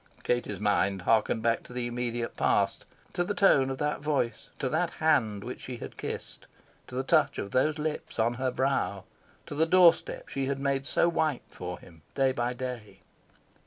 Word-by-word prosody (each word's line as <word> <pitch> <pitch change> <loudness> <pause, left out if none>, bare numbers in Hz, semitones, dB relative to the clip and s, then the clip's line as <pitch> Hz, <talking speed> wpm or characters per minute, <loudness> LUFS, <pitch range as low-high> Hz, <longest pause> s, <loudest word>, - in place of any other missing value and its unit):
Katie's 120 0 -1
mind 100 -2 +1
harked 110 +1 +2
back 115 0 +2
to - - -13
the 125 -1 -2
immediate 120 -1 -3
past - - +1 0.3
to 175 - +1
the 205 +3 -2
tone 135 -9 +4
of 135 - -3
that 150 +1 -1
voice, 145 -5 -1
to 135 - -1
that 170 +6 +1
hand 115 -11 +1
which 125 - -6
she 125 -1 -6
had - - -8
kissed, - - -6 0.4
to 125 - -9
the 130 - 0
touch - - +3
of 100 - -4
those 150 +4 +2
lips 155 0 -4
on 115 +1 +2
her 130 +1 -1
brow, 130 -7 0 0.4
to - - -7
the 160 +3 +2
door 180 -1 +8
step - - -9
she 135 -1 -2
had 140 0 -1
made 140 0 -1
so 170 - +3
white 155 -5 0
for 90 0 -6
him, 80 -3 -16
day 135 -1 +3
by 120 -1 -1
day... 125 -4 -6
130 Hz, 195 wpm, -29 LUFS, 115-145 Hz, 0.4 s, door